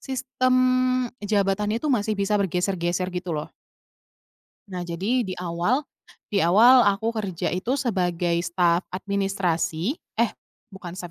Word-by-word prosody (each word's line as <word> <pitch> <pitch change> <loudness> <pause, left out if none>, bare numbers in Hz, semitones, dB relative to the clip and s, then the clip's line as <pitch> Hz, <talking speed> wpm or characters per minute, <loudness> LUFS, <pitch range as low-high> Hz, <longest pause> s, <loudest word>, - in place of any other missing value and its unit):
sistem 255 -1 -1 0.7
jabatannya 205 +1 0
itu 295 - +2
masih 215 -3 0
bisa 200 +1 -1
bergeser-geser, 180 -1 -1
gitu 180 -2 -3
loh. 150 - -6 1.2
Nah, 180 -2 -5
jadi 195 +9 -1
di 190 - -5
awal, 180 - 0 0.5
di 200 -2 +1
awal 235 +8 +7
aku 210 +3 +1
kerja 200 -6 -2
itu 240 +9 -1
sebagai 175 -7 0
staf 170 0 +1
administrasi 195 - -1 0.2
eh, 235 - +3 0.4
bukan 190 -4 -9
staf 175 -2 -7
195 Hz, 125 wpm, -24 LUFS, 175-220 Hz, 1.2 s, awal